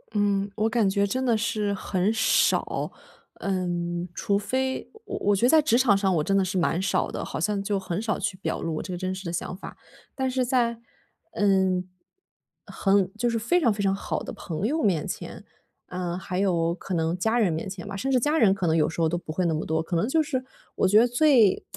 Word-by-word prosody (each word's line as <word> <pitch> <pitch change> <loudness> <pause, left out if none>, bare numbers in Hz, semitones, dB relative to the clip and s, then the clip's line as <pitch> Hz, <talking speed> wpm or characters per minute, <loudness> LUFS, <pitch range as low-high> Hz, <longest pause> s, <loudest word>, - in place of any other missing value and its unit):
嗯， 200 -1 +1
我 220 +1 +1
感 225 -3 +2
觉 200 +1 +2
真 255 +6 -2
的 235 -3 +2
是 215 -2 -1
很 190 0 0
少， 220 0 +1 0.5
嗯， 175 -2 -2
除 200 0 0
非 260 +6 -2 0.2
我 - - -5
我 205 0 +2
觉 200 - +2
得 - - +4
在 315 +1 +6
职 240 -6 +3
场 250 -5 +4
上 195 -1 +1
我 155 - +1
真 195 - 0
的 195 - +4
是 185 0 -2
蛮 175 0 +1
少 190 -1 0
的， - - -4
好 - - -5
像 205 +4 0
就 200 0 -1
很 185 0 -3
少 220 -2 -1
去 200 -2 -2
表 195 - -3
露 165 -1 -2
我 - - -2
这 185 - -7
个 - - -3
真 185 +1 -2
实 190 +1 -8
的 170 - -3
想 175 +1 -4
法， 185 - -10 0.4
但 265 -1 -1
是 255 0 0
在， 240 -2 +1 0.6
嗯， 190 - +2 0.8
很 195 -2 +1
就 240 +2 +1
是 230 - 0
非 240 +11 +1
常 240 - +4
非 205 -1 -2
常 195 -1 +2
好 195 - -3
的 - - -6
朋 170 +3 -4
友 305 +7 0
面 180 - +1
前， - - -7 0.4
呃， 180 -1 -4
还 185 0 -4
有 170 -4 +1
可 185 +1 -5
能 165 0 0
家 220 +6 0
人 205 -8 +2
面 160 +5 -4
前 190 0 -8
吧， 200 - -6
甚 265 +8 -2
至 255 - +4
家 300 +6 +1
人 215 -5 +5
可 190 - -2
能 160 -1 +2
有 155 - +2
时 165 - -7
候 165 - +3
都 165 - -1
不 170 -2 -5
会 180 +3 -1
那 165 - +1
么 155 - -2
多， 160 +1 -1
可 170 - -3
能 170 +6 +1
就 315 +3 +3
是 260 -4 -2 0.3
我 - - +2
觉 205 +3 +6
得 240 - +5
最 245 -5 +4
195 Hz, 255 characters per minute, -25 LUFS, 180-230 Hz, 0.8 s, 在